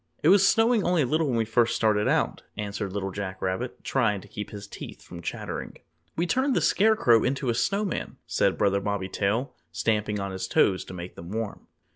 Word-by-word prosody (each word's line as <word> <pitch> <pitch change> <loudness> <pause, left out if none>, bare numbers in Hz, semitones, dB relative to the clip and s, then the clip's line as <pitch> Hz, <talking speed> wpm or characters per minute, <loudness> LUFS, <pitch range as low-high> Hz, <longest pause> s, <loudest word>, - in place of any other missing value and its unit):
"It 155 - +5
was 195 +1 +6
snowing 225 -1 +4
only 175 -3 +2
a - - +1
little 155 +5 +1
when 130 - 0
we 115 - +1
first 115 +1 +2
started 105 -2 +2
out," - - +1 0.2
answered 100 -1 -3
Little 95 0 -3
Jack 95 -1 -5
Rabbit, 95 0 -3
trying 105 -1 +1
to - - -14
keep 105 - -6
his 100 -1 -8
teeth 100 - -9
from 85 -1 -10
chattering. - - -5 0.4
"We 170 - 0
turned 260 +7 +1
the - - +4
Scarecrow 200 - +4
into 135 0 0
a - - +3
Snowman," 200 - -1
said - - +1
Brother 100 -1 +2
Bobby 100 -1 -2
Tail, 105 +8 -1 0.2
stamping 105 +4 0
on 100 0 -3
his 95 0 -4
toes 95 0 +3
to 95 - -9
make 90 0 -7
them 85 +1 -10
warm. 110 0 -4
105 Hz, 205 wpm, -26 LUFS, 100-150 Hz, 0.4 s, was